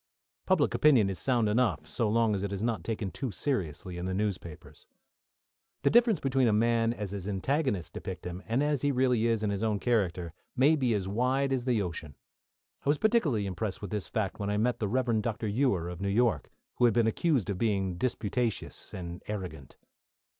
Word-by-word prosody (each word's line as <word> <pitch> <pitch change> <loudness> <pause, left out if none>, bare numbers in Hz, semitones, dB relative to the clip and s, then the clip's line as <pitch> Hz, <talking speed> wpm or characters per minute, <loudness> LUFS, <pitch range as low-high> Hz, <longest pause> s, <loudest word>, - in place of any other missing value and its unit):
Public 185 -6 +3
opinion 125 -10 +4
is 95 - -6
sound 120 -4 +2
enough, 115 +2 +1
so 115 -4 0
long 115 0 +2
as 100 - -1
it 100 0 -3
is 100 +1 -3
not 115 -1 -1
taken 110 -4 -3
too 135 - -4
seriously 90 - -3
in 90 - -3
the 95 - -2
newspapers. 95 -6 -5 1.0
The - - +4
difference 230 - +5
between 135 -2 +2
a - - +4
man 115 +1 +2
as 105 -5 -5
his 100 -1 -5
antagonists 105 - -1
depict - - -7
him, 90 +1 -5
and 120 +5 +1
as 150 -2 0
he 145 - +2
really 125 -3 +2
is 115 -2 +1
in 105 - +1
his 100 0 -2
own 110 -2 +1
character, 90 -8 0 0.2
may 140 +5 +5
be 125 -6 +1
as 95 -2 -2
wide 130 +6 +1
as 125 -2 -1
the 120 -5 +2
ocean. 80 -5 -6 0.7
I - - -1
was 145 - +3
particularly 165 - +2
impressed 95 +1 -3
with 100 - -5
this 105 -3 -3
fact 105 -3 -2
when 100 0 -2
I 105 - 0
met 120 +2 +1
the 105 - 0
Rev. 120 0 +1
Dr. 110 0 -2
Ewer 100 -6 +1
of 90 +1 -7
New 100 - 0
York, 105 - +1 0.3
who 125 - +4
had 115 -3 +3
been 120 -2 +4
accused 115 - +1
of 95 - -4
being 95 -5 0
disputatious 115 -1 -2
and 85 -1 -6
arrogant. 90 -10 -6
110 Hz, 205 wpm, -29 LUFS, 95-125 Hz, 1.0 s, difference